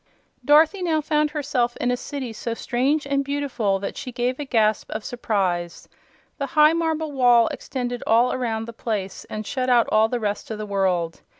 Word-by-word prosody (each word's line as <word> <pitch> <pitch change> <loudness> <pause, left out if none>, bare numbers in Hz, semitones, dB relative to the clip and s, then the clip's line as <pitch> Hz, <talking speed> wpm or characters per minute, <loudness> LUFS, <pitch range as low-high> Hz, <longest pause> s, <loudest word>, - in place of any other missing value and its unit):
Dorothy 315 +6 +4
now 325 -3 +1
found 300 0 +1
herself 270 -5 -1
in 245 - 0
a - - +1
city 260 -2 -6
so 230 +1 -4
strange 270 +6 0
and 280 0 0
beautiful 275 -8 -1
that 195 - -5
she 250 - -6
gave 245 +2 -2
a 290 - -3
gasp 220 -4 +1
of 215 0 -5
surprise. 190 -8 -2 0.5
The 280 - -1
high 305 +1 +7
marble 320 -2 -1
wall 245 -4 +5
extended 245 -2 -4
all 235 +3 +4
around 225 -3 -2
the 235 - -9
place 210 -4 -4
and 215 0 -5
shut 255 +3 -2
out 240 -2 +4
all 220 +1 +4
the 245 - -1
rest 210 -2 -3
of 220 - -4
the 215 - -5
world. 185 -5 -1
245 Hz, 190 wpm, -23 LUFS, 215-285 Hz, 0.5 s, high